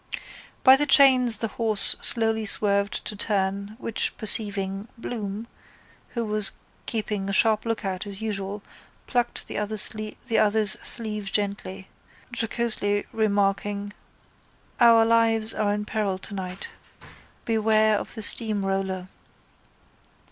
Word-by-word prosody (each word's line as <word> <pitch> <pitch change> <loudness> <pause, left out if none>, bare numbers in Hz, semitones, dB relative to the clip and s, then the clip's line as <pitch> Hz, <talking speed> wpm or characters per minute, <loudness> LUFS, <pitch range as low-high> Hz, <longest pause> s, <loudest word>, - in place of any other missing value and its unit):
By 260 0 +7
the 295 +1 +1
chains 255 -5 +6
the 225 - -3
horse 215 -1 +3
slowly 225 -1 +5
swerved 200 -1 0
to 210 - -4
turn, 200 0 -2
which 230 -3 -2
perceiving, 205 -2 +1
Bloom, 220 -2 -6 0.7
who 235 -1 -2
was 210 -1 +3 0.3
keeping 210 -3 -3
a - - -3
sharp 215 +2 +2
lookout 195 -3 -4
as 200 -1 -7
usual, 205 -2 -5 0.4
plucked 245 -2 -2
the - - -5
other's 210 0 -1 1.0
sleeve 210 -4 -2
gently, 200 -2 -4 0.5
jocosely 220 -3 -2
remarking: 205 -1 -1 0.9
—Our 230 -1 +5
lives 225 -1 +1
are 210 -1 -1
in 210 0 -3
peril 205 -3 -3
tonight. 190 -1 -6 0.8
Beware 220 -1 +1
of - - -8
the 220 - -4
steamroller. 195 -4 +3
210 Hz, 110 wpm, -24 LUFS, 200-225 Hz, 1.0 s, By